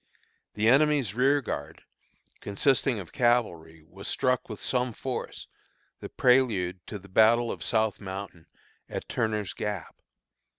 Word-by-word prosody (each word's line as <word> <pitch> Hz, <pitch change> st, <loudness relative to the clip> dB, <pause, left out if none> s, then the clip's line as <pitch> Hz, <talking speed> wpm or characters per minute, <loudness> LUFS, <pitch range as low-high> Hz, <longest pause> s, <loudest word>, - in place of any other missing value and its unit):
The 105 Hz, +1 st, +1 dB
enemy's 140 Hz, -4 st, +3 dB
rearguard, 130 Hz, -, 0 dB, 0.6 s
consisting 125 Hz, +4 st, +1 dB
of 95 Hz, -4 st, -8 dB
cavalry, 85 Hz, -10 st, 0 dB
was 95 Hz, +4 st, -10 dB
struck 125 Hz, -2 st, 0 dB
with 110 Hz, -, -7 dB
some 125 Hz, -2 st, -1 dB
force, 130 Hz, +3 st, -5 dB, 0.5 s
the -, -, -8 dB
prelude 110 Hz, -9 st, +2 dB
of 105 Hz, -3 st, -7 dB
the -, -, -13 dB
battle 115 Hz, +4 st, +4 dB
of -, -, -7 dB
South 110 Hz, -2 st, 0 dB
Mountain, 95 Hz, -3 st, -7 dB, 0.4 s
at -, -, -5 dB
Turner's 105 Hz, -3 st, -1 dB
Gap. 105 Hz, -5 st, -5 dB
110 Hz, 125 wpm, -27 LUFS, 95-125 Hz, 0.6 s, battle